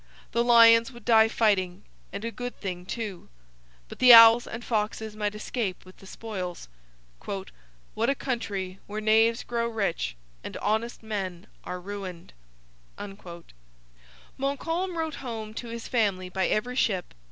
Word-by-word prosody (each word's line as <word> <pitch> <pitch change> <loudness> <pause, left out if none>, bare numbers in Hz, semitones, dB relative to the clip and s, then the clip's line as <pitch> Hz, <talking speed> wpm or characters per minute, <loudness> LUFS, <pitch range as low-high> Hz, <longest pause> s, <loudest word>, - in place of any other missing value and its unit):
The 235 - +1
lions 230 0 +6
would 240 -3 -14
die 225 -2 +6
fighting 200 -5 +1 0.3
and 200 +3 -6
a 230 - -3
good 245 +1 -7
thing 180 -2 -5
too! 210 -6 -5 0.6
But - - -11
the 250 -1 +8
owls 230 +1 +9
and 235 +1 -7
foxes 215 -1 -2
might 210 -1 -2
escape 210 -3 -4
with 185 - -16
the 195 - -15
spoils. 185 - -6 1.3
'What 230 +3 0
a 275 - +2
country, 205 -8 -4
where 210 +1 -4
knaves 225 +2 +3
grow 235 -1 -2
rich 195 - -2 0.3
and - - -6
honest 220 +3 -2
men 195 -4 -4 0.2
are 180 - -5
ruined!' 185 - -8 2.1
Montcalm 330 +6 -2
wrote 320 -2 -2
home 225 -4 -6
to 235 - -6
his 230 0 -7
family 200 -7 0
by 190 0 0
every 245 +4 -1
ship. 190 -8 0
220 Hz, 140 wpm, -27 LUFS, 195-235 Hz, 2.1 s, owls